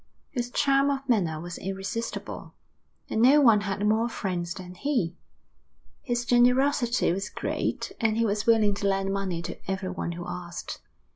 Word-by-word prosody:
His 245 -2 -2
charm 275 +2 +3
of 275 -1 -2
manner 175 - +1
was 175 +2 -7
irresistible, 195 +4 -5 0.5
and 220 - 0
no 270 +5 +7
one 230 -7 +6
had 200 0 -2
more 220 +3 +2
friends 175 -6 -3
than 180 -1 -8
he. 225 - -1 0.9
His 240 -2 -2
generosity 245 0 +3
was 195 +4 -2
great, - - -2
and 220 -2 +1
he 230 - +3
was 210 0 -1
willing 220 -3 +5
to 200 0 -1
lend 195 0 0
money 190 -4 -2
to - - -6
everyone 185 -2 -3
who 175 +1 -6
asked. 175 -1 -6
210 Hz, 155 wpm, -27 LUFS, 185-240 Hz, 0.9 s, no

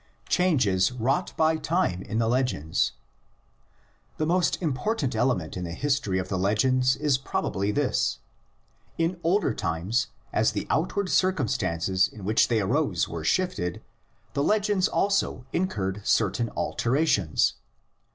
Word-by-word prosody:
CHANGES 125 - +2
WROUGHT 130 +9 -1
BY 160 0 +3
TIME 155 - 0
IN 110 - -4
THE 115 -1 +2
LEGENDS. 120 - 0 1.2
The 155 - 0
most 175 +2 +1
important 155 - -1
element 110 -9 0
in 90 - -4
the 85 -1 -5
history 140 -9 0
of 95 0 -2
the 95 -1 -2
legends 130 +6 +2
is 145 -3 +1
probably 100 -6 -2
this: 140 +2 0 0.8
in 165 +2 0
older 170 - +2
times 95 +6 -1 0.3
as 110 - +2
the - - -3
outward 185 +4 0
circumstances 95 - +1
in 105 - -12
which 110 +3 +3
they 115 -3 +1
arose 95 - 0
were 85 -2 -6
shifted, 90 - -1 0.5
the 140 - 0
legends 205 +2 +2
also 195 -12 0
incurred 105 - -1
certain 115 +3 +1
alter 115 - -2
ations. 105 - +2
125 Hz, 130 wpm, -26 LUFS, -, 1.2 s, BY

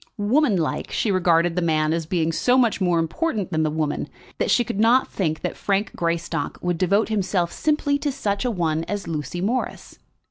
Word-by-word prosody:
Woman 225 +2 +2
like, 160 -3 -2
she 215 - 0
regarded 175 -2 +2
the 180 - 0
man 155 -2 +1
as 165 -2 -2
being 165 -2 0
so 250 +9 +2
much 235 -5 +2
more 175 -2 +2
important 195 - -1
than 160 -1 +1
the 155 - +1
woman, 150 -1 -2 0.3
that - - 0
she 240 - +4
could 210 - -4
not 235 +4 +4
think 160 -5 -2
that - - -3
Frank 200 +1 -1
Greystock 170 -3 -2
would 175 -2 -2
devote 200 +4 +2
himself 190 -4 0
simply 295 -2 0
to 290 -1 -1
such 205 -6 -2
a 250 - 0
one 165 -6 -1
as 205 -2 -4
Lucy 160 +1 -4
Morris. 235 +7 -3
185 Hz, 200 wpm, -23 LUFS, 165-220 Hz, 0.3 s, she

